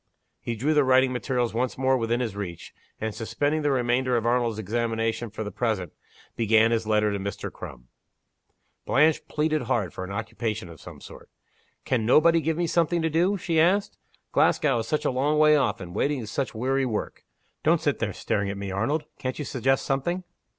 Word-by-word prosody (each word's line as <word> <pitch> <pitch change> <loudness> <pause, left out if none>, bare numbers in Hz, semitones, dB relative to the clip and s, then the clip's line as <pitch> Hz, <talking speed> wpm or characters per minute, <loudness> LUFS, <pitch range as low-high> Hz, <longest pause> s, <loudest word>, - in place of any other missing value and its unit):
He 120 - -4
drew 140 +8 +1
the 150 -1 +4
writing 130 0 +4
materials 125 -1 -1
once 125 +2 -1
more 130 0 +2
with 115 -2 -2
in 120 +1 +2
his 115 -5 -3
reach, 95 -5 -7 0.3
and, 110 -1 -3
suspending 145 +8 -1
the 145 - +1
remainder 125 -1 +1
of 115 - -2
Arnold's 120 -2 +1
examination 115 +2 -1
for 110 +1 -5
the 105 - -5
present, 100 -6 -2 0.4
began 110 0 +4
his 115 -2 0
letter 105 -1 +2
to 100 - -2
Mr. 100 +1 -5
Crum. - - -10 1.0
Blanche 155 +4 +3
pleaded 155 0 0
hard 115 -8 -1
for - - -6
an 95 - -7
occupation 110 -1 -4
of 80 -2 -13
some - - -11
sort. - - -13 0.6
"Can 125 -4 0
nobody 165 +8 +5
give 160 +1 -1
me 175 - +1
something 170 0 +1
to 160 - 0
do?" 180 +6 +2
she 165 -3 0
asked. 190 +5 +2 0.3
"Glasgow 135 -6 +3
is 110 - -4
such 150 - -1
a - - +2
long 140 +4 +1
way 150 0 +6
off, 130 -8 +1
and 90 -2 -8
waiting 145 +8 0
is 105 -2 -7
such 135 -1 -2
weary 135 +4 0
work. 115 -5 -3 0.4
Don't - - +3
sit - - 0
there - - -1
staring 100 -1 -2
at 100 - -4
me, 100 -1 -5
Arnold! 115 +11 0 0.2
Can't 130 -1 -3
you 150 - -4
suggest 135 +1 0
something?" 175 +7 -1
125 Hz, 200 wpm, -26 LUFS, 110-145 Hz, 1.0 s, way